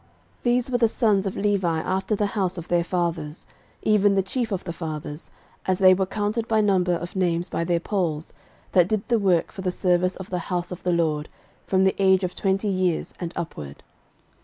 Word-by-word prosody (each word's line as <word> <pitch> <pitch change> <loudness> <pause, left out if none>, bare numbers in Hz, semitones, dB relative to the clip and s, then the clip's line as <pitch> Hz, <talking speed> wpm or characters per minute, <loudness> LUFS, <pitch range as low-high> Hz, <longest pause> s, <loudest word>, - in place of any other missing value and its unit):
13:023:024 - - -33 0.4
These 245 +1 +2
were 245 - +2
the 230 - +5
sons 210 -4 +2
of 190 - -4
Levi 195 -5 +1
after 190 +5 -1
the 205 - 0
house 195 -3 -1
of 170 0 -7
their 175 -1 +2
fathers; 170 -3 -2 0.4
even 205 -2 +4
the 195 - +2
chief 230 +3 -2
of 190 -2 -2
the 170 - -5
fathers, 155 -2 -6 0.4
as 185 -1 +2
they 185 -1 +7
were 190 0 0
counted 215 +3 -2
by 220 -1 +2
number 190 -4 +2
of 175 +3 -4
names 175 -1 0
by - - -1
their 170 0 +1
polls, 170 -5 -2 0.4
that 180 -1 +4
did 215 -2 -1
the 235 -2 +3
work 185 -5 +2
for 200 - -7
the 185 -1 -1
service 180 0 +1
of 190 -1 -9
the 180 - -1
house 175 -1 -2
of 180 0 -6
the 180 - 0
LORD, 155 -3 0 0.4
from 190 0 +3
the 190 - +3
age 190 0 +4
of 180 0 -2
twenty 195 +1 0
years 185 -4 0
and 170 -2 -4
upward. 75 - -6
185 Hz, 210 wpm, -24 LUFS, 175-200 Hz, 0.4 s, they